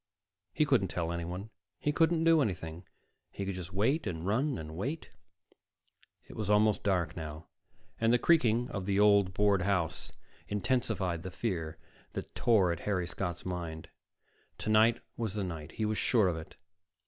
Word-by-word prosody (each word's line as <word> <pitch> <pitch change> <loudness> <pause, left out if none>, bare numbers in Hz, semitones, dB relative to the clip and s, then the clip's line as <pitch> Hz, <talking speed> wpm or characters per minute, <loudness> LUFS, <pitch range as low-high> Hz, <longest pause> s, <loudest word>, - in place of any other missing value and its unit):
He 150 - +2
couldn't 130 -9 +3
tell 85 -1 -2
anyone, 90 +5 -5 0.3
he 150 - +1
couldn't 165 +2 +3
do 165 -1 +5
anything. 85 - -3 0.4
He 100 - -5
could 95 - -2
just 90 -1 -7
wait, 120 - +1
and 80 -1 -4
run, 125 +8 +1
and 80 0 -7
wait 140 - -4 1.2
It - - -11
was 105 -2 -3
almost 105 0 +4
dark 90 -5 0
now 80 -1 -6 0.5
and 115 0 +3
the 120 - +5
creaking 120 -6 +3
of 100 -3 -4
the 100 0 +2
old 100 -2 +5
board 100 -2 +3
house 90 -5 -1 0.4
intensified 100 -6 0
the 95 - -6
fear 85 -5 -3 0.4
that - - -6
tore 100 -7 +3
at 85 - -3
Harry 95 -3 -1
Scott's 85 0 -4
mind. 85 -3 -5 0.7
Tonight 110 +2 +3 0.2
was 110 -4 -2
the 105 - -1
night; 80 -3 -6
he 110 - -1
was 105 0 0
sure 110 -6 +3
of 90 - 0
it. 80 0 -9
100 Hz, 165 wpm, -31 LUFS, 85-110 Hz, 1.2 s, do